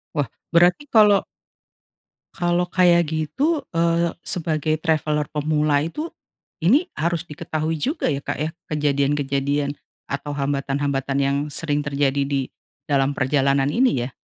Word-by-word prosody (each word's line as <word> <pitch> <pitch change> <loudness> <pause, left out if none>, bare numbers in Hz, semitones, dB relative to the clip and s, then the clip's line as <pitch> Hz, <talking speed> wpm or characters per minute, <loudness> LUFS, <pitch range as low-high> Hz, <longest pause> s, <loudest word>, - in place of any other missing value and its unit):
Wah 145 -4 0 0.3
berarti 175 - +4
kalau 210 -4 +6 1.1
Kalau 175 0 0
kayak 175 -3 +4
gitu, 270 - -1
eee, 170 0 +1
sebagai 155 -2 -1
traveller 155 -2 0
pemula 150 -1 +1
itu, 300 - -4 0.5
ini 265 - +4
harus 170 +1 -1
diketahui 160 0 -3
juga, 295 - -1
ya 140 0 -2
Kak - - -4
ya, 155 +2 -1 0.2
kejadian-kejadian 140 -1 0 0.4
atau 140 +1 -4
hambatan-hambatan 140 0 -1
yang 140 0 +1
sering 145 0 -1
terjadi 140 -1 0
di 140 -1 0 0.4
dalam 140 -1 +1
perjalanan 135 0 +2
ini, 235 - +2
ya? 130 - -5
150 Hz, 120 wpm, -22 LUFS, 140-170 Hz, 1.1 s, kalau